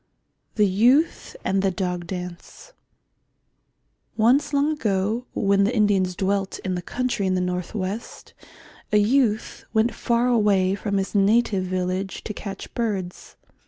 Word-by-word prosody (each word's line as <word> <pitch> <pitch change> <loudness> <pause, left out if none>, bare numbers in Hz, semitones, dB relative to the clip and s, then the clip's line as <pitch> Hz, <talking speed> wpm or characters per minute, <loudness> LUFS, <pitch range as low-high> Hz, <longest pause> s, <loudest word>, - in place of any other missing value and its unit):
THE 210 - +4
YOUTH 245 - +2
AND 195 0 +1
THE 195 - +2
DOG 180 -2 -3
DANCE 180 - -8 1.4
Once 245 +7 +3
long 285 +1 +2
ago, 220 -3 -1
when 200 -1 +3
the 220 +5 +1
Indians 195 -4 +2
dwelt 195 +1 -1
in 185 - -1
the 180 - -3
country 245 -1 -2
in 185 - +1
the - - +1
north 180 +1 -3
west, 200 +3 -5 0.6
a 210 - +4
youth 220 0 +1
went 220 +2 +3
far 235 +1 +1
away 205 -6 +3
from 200 0 -2
his 195 0 -2
native 205 -1 +2
village 185 +1 -3
to 215 - -5
catch 195 -1 -8
birds. 200 -6 -4
200 Hz, 140 wpm, -23 LUFS, 185-230 Hz, 1.4 s, THE